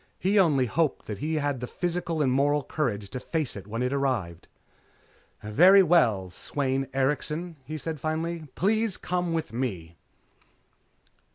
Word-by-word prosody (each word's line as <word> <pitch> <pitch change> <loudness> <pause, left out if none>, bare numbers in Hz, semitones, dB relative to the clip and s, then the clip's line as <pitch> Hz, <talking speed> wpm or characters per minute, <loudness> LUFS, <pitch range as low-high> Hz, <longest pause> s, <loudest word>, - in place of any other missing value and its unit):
He 200 +3 +2
only 145 -8 +4
hoped 150 +6 0
that 105 -2 -6
he 155 +5 -1
had 145 -3 -1
the 125 - -5
physical 170 -2 -2
and 130 - +2
moral 145 +2 +2
courage 105 -10 -2
to 130 - -4
face 155 +1 -2
it 100 -1 -9
when 115 +3 -3
it 125 +2 0
arrived. 120 -12 -2 1.0
"Very 180 - +6
well, 115 - +3
Sweyn 135 +4 -2
Erikson," 150 +5 -1
he 155 +4 -5
said 155 0 -5
finally. 160 +2 -3
"Please 215 +1 +1
come 180 -1 -2
with 160 -8 -2
me." 90 -10 -4
145 Hz, 150 wpm, -27 LUFS, 125-165 Hz, 1.0 s, Very